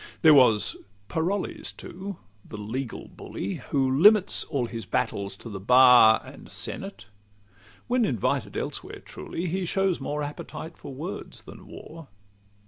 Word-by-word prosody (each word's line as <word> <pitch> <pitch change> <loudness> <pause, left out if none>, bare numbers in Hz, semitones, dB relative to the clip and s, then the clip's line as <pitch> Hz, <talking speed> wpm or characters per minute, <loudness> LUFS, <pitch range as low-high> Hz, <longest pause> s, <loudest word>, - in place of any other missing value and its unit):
LXXXIV - - -27
There 160 -1 +9
was 125 -7 +4 0.3
Parolles, 180 +5 -2
too, 190 +1 -7 0.3
the - - -9
legal 115 +4 -5
bully, 100 - -6
Who 135 -2 +2
limits 195 +9 +5
all 135 -5 -1
his 115 -1 -7
battles 100 -1 -2
to - - -11
the 100 -3 -6
bar 125 0 +7
And - - -12
senate: 105 +3 -6 0.8
when 245 0 +1
invited 120 - -1
elsewhere, - - -5
truly, 170 - -6
He 185 +3 -2
shows 190 0 +1
more 145 +2 -3
appetite 155 +2 -7
for - - -10
words 155 +9 -7
than - - -13
war. 165 -2 -11
140 Hz, 140 wpm, -26 LUFS, 115-175 Hz, 0.8 s, There